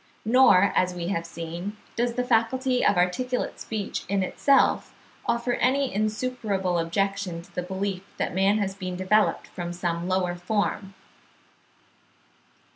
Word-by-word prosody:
Nor, 215 Hz, -5 st, +5 dB
as 180 Hz, 0 st, +2 dB
we 175 Hz, 0 st, -3 dB
have 170 Hz, -4 st, -2 dB
seen, 170 Hz, +5 st, -6 dB, 0.2 s
does 235 Hz, 0 st, 0 dB
the 250 Hz, -, 0 dB
faculty 250 Hz, +2 st, +1 dB
of 200 Hz, -, +3 dB
articulate 250 Hz, +8 st, 0 dB
speech 215 Hz, -3 st, -4 dB
in 195 Hz, -1 st, +1 dB
itself 275 Hz, +8 st, +2 dB, 0.3 s
offer 235 Hz, +1 st, +1 dB
any 270 Hz, +2 st, +1 dB
insuperable 215 Hz, -4 st, -1 dB
objection 190 Hz, 0 st, -1 dB
to -, -, -21 dB
the -, -, -2 dB
belief 190 Hz, +1 st, -3 dB, 0.2 s
that -, -, -2 dB
man 195 Hz, +3 st, +3 dB
has 200 Hz, -2 st, -1 dB
been 185 Hz, -2 st, -5 dB
developed 185 Hz, +4 st, +2 dB
from 175 Hz, -1 st, -5 dB
some 175 Hz, 0 st, -2 dB
lower 185 Hz, -1 st, +1 dB
form. 195 Hz, +1 st, -2 dB
195 Hz, 135 wpm, -26 LUFS, 180-230 Hz, 0.3 s, Nor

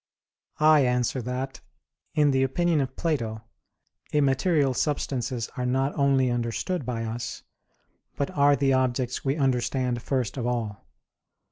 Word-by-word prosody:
I 155 Hz, 0 st, +6 dB
answer 125 Hz, 0 st, 0 dB
that, 125 Hz, +1 st, -4 dB, 0.5 s
In 150 Hz, -2 st, +4 dB
the 135 Hz, -1 st, +2 dB
opinion 160 Hz, +4 st, +2 dB
of 130 Hz, -1 st, -4 dB
Plato, 115 Hz, -9 st, -2 dB, 0.7 s
immaterial 140 Hz, 0 st, +2 dB
substances 125 Hz, -4 st, -1 dB
are 125 Hz, -, -1 dB
not 135 Hz, +3 st, +1 dB
only 135 Hz, -3 st, +2 dB
understood 120 Hz, +6 st, -2 dB
by 115 Hz, -2 st, -2 dB
us, 120 Hz, +2 st, -5 dB, 0.7 s
but 140 Hz, -, -2 dB
are 145 Hz, 0 st, +4 dB
the 135 Hz, 0 st, +2 dB
objects 130 Hz, -1 st, 0 dB
we 135 Hz, +1 st, +1 dB
understand 125 Hz, -3 st, 0 dB
first 130 Hz, 0 st, -2 dB
of 120 Hz, -2 st, -2 dB
all. 115 Hz, -4 st, -3 dB
130 Hz, 130 wpm, -26 LUFS, 120-140 Hz, 0.7 s, I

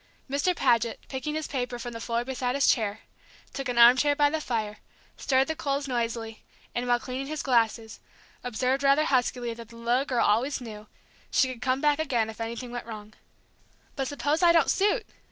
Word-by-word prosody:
Mr. 285 Hz, +7 st, 0 dB
Paget, 230 Hz, -5 st, +2 dB
picking 270 Hz, +3 st, -4 dB
his 310 Hz, 0 st, -2 dB
paper 250 Hz, -2 st, -3 dB
from 240 Hz, 0 st, -6 dB
the 230 Hz, -, -7 dB
floor 235 Hz, +1 st, -2 dB
beside 255 Hz, -1 st, -2 dB
his 280 Hz, -, +2 dB
chair, 215 Hz, -3 st, +1 dB, 0.5 s
took 275 Hz, -2 st, -4 dB
an 245 Hz, -, -2 dB
arm 235 Hz, +1 st, +9 dB
chair 290 Hz, +2 st, +2 dB
by 290 Hz, 0 st, +3 dB
the 315 Hz, 0 st, -1 dB
fire, 215 Hz, -6 st, -3 dB, 0.4 s
stirred 265 Hz, -1 st, +2 dB
the 320 Hz, -, -2 dB
coals 280 Hz, -3 st, -2 dB
noisily, 230 Hz, -3 st, -3 dB, 0.3 s
and 245 Hz, +1 st, -2 dB
while 245 Hz, 0 st, +3 dB
cleaning 260 Hz, +2 st, -5 dB
his 310 Hz, 0 st, -4 dB
glasses, 225 Hz, -3 st, +1 dB, 0.4 s
observed 255 Hz, +3 st, 0 dB
rather 280 Hz, +2 st, +4 dB
huskily 245 Hz, -3 st, 0 dB
that 230 Hz, -1 st, -11 dB
the 230 Hz, -, -14 dB
little 240 Hz, +3 st, 0 dB
girl 250 Hz, -4 st, +1 dB
always 235 Hz, +7 st, +1 dB
knew, 215 Hz, -3 st, -9 dB, 0.4 s
she 260 Hz, -, +2 dB
could 240 Hz, -, -14 dB
come 260 Hz, +1 st, 0 dB
back 295 Hz, 0 st, +2 dB
again 240 Hz, -8 st, 0 dB
if 220 Hz, -, -11 dB
anything 235 Hz, +2 st, -5 dB
went 240 Hz, -1 st, -6 dB
wrong. 215 Hz, -1 st, -9 dB, 0.8 s
"But 270 Hz, -2 st, -2 dB
suppose 290 Hz, +4 st, -1 dB
I 345 Hz, -1 st, +6 dB
don't 330 Hz, -1 st, +4 dB
suit?" 415 Hz, +3 st, +1 dB
250 Hz, 195 wpm, -27 LUFS, 230-280 Hz, 0.8 s, arm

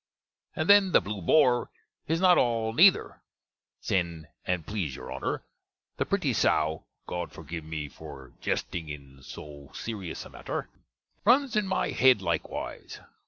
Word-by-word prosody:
And 155 Hz, -, -1 dB
then 200 Hz, -3 st, +6 dB
the -, -, +8 dB
Blew 100 Hz, -1 st, -5 dB
Bore 125 Hz, -, +4 dB, 0.4 s
is 165 Hz, +1 st, +1 dB
not 180 Hz, -1 st, +6 dB
all 115 Hz, -2 st, +1 dB
neither: 185 Hz, -, +5 dB, 0.6 s
sen', 85 Hz, -5 st, -1 dB, 0.2 s
and 90 Hz, -3 st, -1 dB
please 90 Hz, -10 st, -3 dB
your -, -, -8 dB
Honner, -, -, -3 dB, 0.5 s
the -, -, -1 dB
pretty -, -, +1 dB
Sowe 80 Hz, 0 st, +1 dB, 0.2 s
(God 90 Hz, 0 st, -4 dB
forgive 85 Hz, -1 st, -7 dB
me 80 Hz, -1 st, -5 dB
for 70 Hz, -1 st, -11 dB
gesting 80 Hz, -3 st, -2 dB
in 70 Hz, -2 st, -10 dB
so 75 Hz, 0 st, -10 dB
serus 100 Hz, -7 st, -5 dB
a -, -, -11 dB
matter) -, -, -5 dB, 0.5 s
runs 255 Hz, +2 st, +4 dB
in 210 Hz, -2 st, +2 dB
my 190 Hz, -, 0 dB
hedd 130 Hz, -4 st, +5 dB
likewise. 85 Hz, -4 st, -4 dB
90 Hz, 145 wpm, -28 LUFS, -, 0.6 s, the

